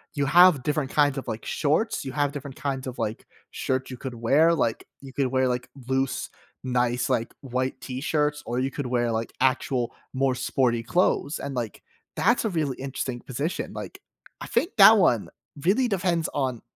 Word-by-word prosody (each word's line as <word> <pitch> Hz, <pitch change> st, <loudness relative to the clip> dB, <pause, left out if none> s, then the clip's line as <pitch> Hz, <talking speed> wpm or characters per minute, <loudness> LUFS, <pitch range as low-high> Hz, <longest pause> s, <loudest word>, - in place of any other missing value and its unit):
you 140 Hz, -, +1 dB
have 170 Hz, -2 st, +6 dB
different 150 Hz, -2 st, -1 dB
kinds 145 Hz, -2 st, +3 dB
of, -, -, -10 dB
like, 110 Hz, -, -5 dB
shorts. 155 Hz, +9 st, 0 dB
You 135 Hz, -, -5 dB
have 145 Hz, 0 st, 0 dB
different 140 Hz, -2 st, -7 dB
kinds 135 Hz, -2 st, -3 dB
of, 125 Hz, -, -6 dB
like, 110 Hz, +1 st, -4 dB, 0.2 s
shirts 130 Hz, 0 st, -2 dB
you 125 Hz, -, -6 dB
could 125 Hz, -1 st, -6 dB
wear, 150 Hz, +9 st, +4 dB
like, 115 Hz, -7 st, -1 dB
you 135 Hz, -1 st, -11 dB
could 135 Hz, -2 st, +1 dB
wear, 130 Hz, 0 st, +1 dB
like, 125 Hz, 0 st, -2 dB, 0.2 s
loose, 130 Hz, -1 st, -1 dB, 0.3 s
nice, 125 Hz, -1 st, 0 dB
like, 115 Hz, -, -1 dB
white 130 Hz, 0 st, -2 dB
t-shirts, 150 Hz, +3 st, -1 dB
or 120 Hz, +1 st, -2 dB
you 135 Hz, +1 st, 0 dB
could 140 Hz, -2 st, -4 dB
wear, 120 Hz, -1 st, 0 dB
like, 115 Hz, 0 st, -2 dB
actual 130 Hz, -2 st, +1 dB, 0.2 s
more 135 Hz, 0 st, +1 dB
sporty 120 Hz, -3 st, +1 dB
clothes, 150 Hz, +1 st, +1 dB
and, 140 Hz, -1 st, -5 dB
like, 115 Hz, -5 st, -4 dB, 0.3 s
that's 235 Hz, +2 st, +2 dB
a -, -, +1 dB
really 155 Hz, -7 st, -1 dB
interesting 130 Hz, -2 st, -4 dB
position. 140 Hz, +7 st, -3 dB
Like, -, -, -8 dB, 0.4 s
I -, -, -6 dB
think 290 Hz, +11 st, 0 dB
that 215 Hz, +3 st, +9 dB
one 120 Hz, -, +3 dB, 0.3 s
really 225 Hz, +8 st, +3 dB
depends 180 Hz, -5 st, 0 dB
on 130 Hz, -4 st, -1 dB
135 Hz, 185 wpm, -25 LUFS, 125-150 Hz, 0.4 s, that